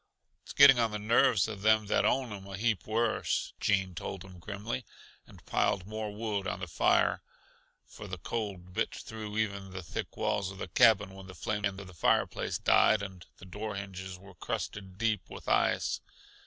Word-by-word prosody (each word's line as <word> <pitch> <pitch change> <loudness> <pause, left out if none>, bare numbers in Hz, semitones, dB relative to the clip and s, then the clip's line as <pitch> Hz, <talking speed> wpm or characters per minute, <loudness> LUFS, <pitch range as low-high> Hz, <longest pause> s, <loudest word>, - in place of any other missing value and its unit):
"It's - - -10
getting 140 -3 +8
on 115 -1 +3
the 105 - -3
nerves 110 0 +3
uh 110 - -4
them 110 +1 +3
that 100 - +2
own 130 -5 +1
'em 100 -1 -9
a 95 0 -6
heap 110 -4 0
worse," 110 +1 0
Gene 95 -2 +1
told 95 +2 -6
him 90 -2 -13
grimly, 105 +7 -4 0.4
and - - -16
piled 95 - +1
more 110 +1 -4
wood 105 -2 -3
on 90 - -3
the 100 - -5
fire; 80 - +2 0.6
for 105 - -10
the 95 -1 -5
cold 95 -1 -5
bit - - -1
through 110 -1 -7
even 100 -3 -1
the 95 -1 -6
thick 80 - -5
walls 100 -3 0
of 95 - -9
the - - -5
cabin 105 +2 +5
when 95 -1 -11
the 95 - -10
flames 105 -2 -1
in 100 - -6
the 95 -2 -10
fireplace 85 - +1
died, 110 -2 +4
and 95 -3 -8
the - - -13
door 105 +3 -5
hinges 95 -1 -6
were 95 +1 -14
crusted 95 +2 -5
deep 110 -3 0
with - - -10
ice. - - +2
100 Hz, 190 wpm, -31 LUFS, 95-110 Hz, 0.6 s, getting